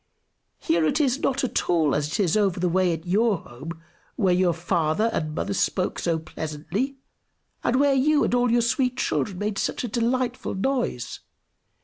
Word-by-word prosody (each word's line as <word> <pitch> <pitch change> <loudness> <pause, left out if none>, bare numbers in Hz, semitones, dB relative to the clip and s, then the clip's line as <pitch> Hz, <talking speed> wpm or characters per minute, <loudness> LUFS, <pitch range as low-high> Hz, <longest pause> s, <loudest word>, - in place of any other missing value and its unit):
Here 165 0 +1
it 210 - +1
is 275 -2 +2
not 270 -1 0
at 255 - -1
all 160 -5 +3
as 145 0 0
it - - -1
is 180 -3 +2
over 200 -4 +2
the 180 - +1
way 180 +1 +2
at 160 0 -4
your 205 +3 +2
home, 160 +5 -10 0.3
where 190 -4 +2
your 180 -1 +3
father 170 +5 0
and 155 -1 -2
mother 200 - -2
spoke 185 -1 0
so 165 -2 0
pleasantly, 160 - -4 0.7
and 240 - +1
where 280 +1 +4
you 290 +3 +3
and - - 0
all 245 0 +3
your 240 0 +4
sweet 250 +2 +1
children 200 -7 -1
made 205 +1 -2
such - - -2
a - - -1
delightful 240 +2 -1
noise. 245 - -2
195 Hz, 180 wpm, -25 LUFS, 165-245 Hz, 0.7 s, where